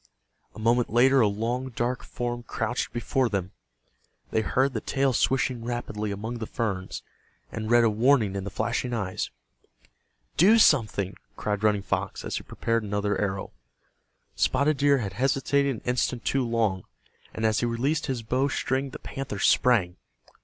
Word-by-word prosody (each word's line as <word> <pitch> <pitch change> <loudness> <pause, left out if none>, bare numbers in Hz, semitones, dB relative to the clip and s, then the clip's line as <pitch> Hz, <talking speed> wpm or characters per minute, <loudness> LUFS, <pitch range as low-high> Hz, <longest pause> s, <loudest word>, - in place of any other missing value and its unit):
A - - -9
moment 120 +2 +2
later 130 +4 +5
a 110 - +5
long 115 +6 -2
dark 120 +1 -2
form 120 0 -4
crouched 115 - -3
before 120 +2 0
them. 95 -3 -2 0.8
They 110 - +2
heard 130 +5 +1
the 110 - -2
tail 135 -1 +1
swishing 125 -1 +1
rapidly 115 -3 -3
among 110 +4 -4
the 110 - -4
ferns, 100 -5 -3 0.5
and 110 0 -4
read 120 0 +5
a 115 - +4
warning 110 -2 +3
in 100 - -3
the 100 - -4
flashing 120 +5 -2
eyes. 95 -4 -3 1.1
"Do 205 +7 +6
something!" 105 - +3 0.2
cried 105 0 -2
Running 105 -2 +2
Fox, 100 -1 -3
as - - -2
he - - -4
prepared 115 0 -1
another 105 0 -1
arrow. 95 -1 -2 0.8
Spotted 140 +3 +2
Deer 140 0 +4
had 100 -7 -3
hesitated 135 +3 +1
an - - -10
instant 125 -1 -1
too 135 -1 +1
long, 110 -6 0 0.5
and 110 - -3
as 110 -1 +2
he 120 - 0
released 135 +8 0
his 130 -4 -2
bow 130 +5 +1
string 135 -1 -1
the 145 - -8
panther 135 -8 -6
sprang. 95 -4 +3
115 Hz, 160 wpm, -26 LUFS, 105-130 Hz, 1.1 s, Do